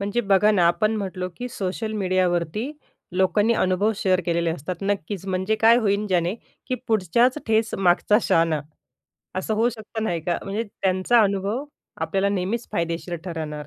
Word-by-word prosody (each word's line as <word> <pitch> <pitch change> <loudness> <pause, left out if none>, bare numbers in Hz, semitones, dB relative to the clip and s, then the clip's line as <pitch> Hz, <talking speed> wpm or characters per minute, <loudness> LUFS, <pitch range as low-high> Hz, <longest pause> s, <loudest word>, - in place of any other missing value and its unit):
म्हणजे 205 +4 0
बघा 200 0 +4
ना, 180 -5 +4
आपण 215 +5 +2
म्हटलो 185 -2 -3
की 250 0 -5
सोशल 215 +1 -3
मीडियावरती 185 - 0 0.4
लोकांनी 205 +4 +3
अनुभव 195 +3 +2
शेअर 185 -2 +2
केलेले 170 -1 +1
असतात. 165 +2 -4
नक्कीच 195 -1 -2
म्हणजे 190 +3 0
काय 230 +2 +6
होईल, 210 -2 +1
ज्याने 180 0 +1 0.3
की 255 - -1
"पुढच्याच 225 +4 +3
ठेस 220 0 +1
मागचा 195 +3 +3
शहाणा." 165 -2 +2 0.7
असं 190 +4 -1
होऊ 230 +3 +3
शकतं 220 0 -6
नाही 170 -5 -1
का? 170 +1 -1
म्हणजे 205 +3 -2 0.2
त्यांचा 190 +5 +3
अनुभव 200 +6 -1 0.4
आपल्याला 195 0 0
नेहमीच 200 +4 -2
फायदेशीर 170 +1 -2
ठरणार. 155 -4 -5
195 Hz, 155 wpm, -23 LUFS, 180-220 Hz, 0.7 s, काय